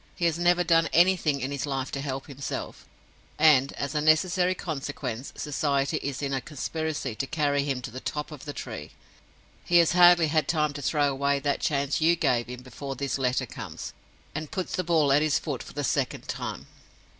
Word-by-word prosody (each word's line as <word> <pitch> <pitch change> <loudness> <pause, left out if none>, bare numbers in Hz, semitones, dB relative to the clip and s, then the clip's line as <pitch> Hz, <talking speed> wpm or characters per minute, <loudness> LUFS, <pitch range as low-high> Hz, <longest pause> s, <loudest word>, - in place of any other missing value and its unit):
"He 170 - -1
has 165 0 +1
never 175 0 +3
done 165 -1 +3
anything 170 -5 +3
in 130 +2 -2
his 140 -1 -3
life 135 -1 -2
to 140 - -3
help 135 -1 -4
himself, 140 -1 -6 0.5
and, 145 -3 +5
as 140 -1 -4
a 150 - 0
necessary 180 +4 +3
consequence, 140 - -5
Society 140 -2 0
is 140 0 -4
in 140 -1 -1
a 135 - -1
conspiracy 155 -2 -3
to 135 +5 -3
carry 145 0 +1
him 135 -3 -2
to 120 - -6
the 130 - -6
top 150 +4 -4
of 150 -3 -10
the 145 - -4
tree. 110 - -7 0.7
He 175 - +3
has 170 -2 +5
hardly 175 -2 +6
had 155 0 +1
time 150 -3 +1
to 145 - -6
throw 145 +2 +2
away 140 +1 +1
that 140 0 0
chance 140 0 0
you 165 +2 +5
gave 120 -7 +1
him 125 0 -8
before 135 +2 -7
this 140 +1 -2
letter 130 -1 +1
comes, - - -8 0.4
and 155 0 -5
puts 185 - -3
the 185 - -1
ball 160 -5 +3
at 145 - +4
his 155 -2 +2
foot - - -4
for - - -10
the - - -3
second - - -1
time. - - -5
145 Hz, 200 wpm, -27 LUFS, 135-160 Hz, 0.7 s, hardly